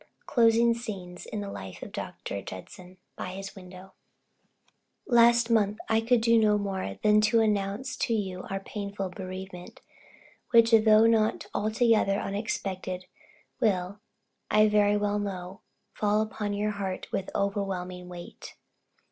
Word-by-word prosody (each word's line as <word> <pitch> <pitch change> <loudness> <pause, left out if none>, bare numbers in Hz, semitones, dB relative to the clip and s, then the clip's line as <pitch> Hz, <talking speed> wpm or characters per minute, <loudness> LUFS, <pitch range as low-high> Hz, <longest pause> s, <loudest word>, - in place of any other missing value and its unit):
CLOSING 235 -2 +4
SCENES 195 -7 -7
IN 210 - -4
THE 200 -1 -5
LIFE 95 -1 -8
OF - - -9
DR. - - -6 0.3
JUDSON. 180 - -10 0.2
BY - - -4
HIS 195 +1 -7
WIDOW. 185 0 -12 1.1
Last 235 -1 +5
month 210 -2 +2
I 225 0 +3
could 235 +1 +2
do 230 0 +4
no 210 -1 +4
more 190 - -3
than 210 0 +5
announce 215 +3 +1
to 230 - 0
you 190 -4 -3
our 195 - -2
painful 200 -1 -5
bereavement, 185 -1 -8 0.7
which 230 -1 +5
though 220 0 +6
not 225 -1 +2
altogether 215 -1 +2
unexpected, 190 -3 -4 0.5
will, 200 -4 0 0.5
I 215 0 +5
very 210 -1 +3
well 205 0 0
know, 190 -1 -5 0.3
fall 210 0 +1
upon 210 -1 -4
your 210 +1 -1
heart 195 -2 -4
with 195 - -2
overwhelming 185 -3 -2
weight. 175 -1 -10
205 Hz, 130 wpm, -28 LUFS, 190-220 Hz, 1.1 s, though